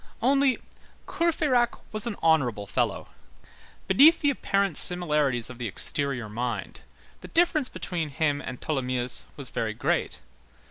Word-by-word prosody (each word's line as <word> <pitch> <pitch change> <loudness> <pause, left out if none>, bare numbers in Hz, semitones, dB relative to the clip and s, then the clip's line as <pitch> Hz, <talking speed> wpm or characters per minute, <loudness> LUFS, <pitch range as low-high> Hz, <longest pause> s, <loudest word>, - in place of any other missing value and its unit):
Only, 275 +2 +2 0.5
Courfeyrac 300 -8 0
was 215 +2 -2
an 225 - -4
honorable 125 -11 +1
fellow. - - -3 0.8
Beneath 285 - +5
the 290 -2 +2
apparent 200 - -1
similarities 150 -9 +4
of 125 -1 -11
the 120 - -3
exterior 125 +3 +1
mind, 120 +3 -5 0.4
the - - -11
difference 325 -5 +2
between 170 -4 -5
him 145 0 -1
and 125 - -8
Tholomyès 125 -4 -2
was 135 -4 -3
very 110 -1 -3
great. - - -2
155 Hz, 130 wpm, -25 LUFS, -, 0.8 s, Beneath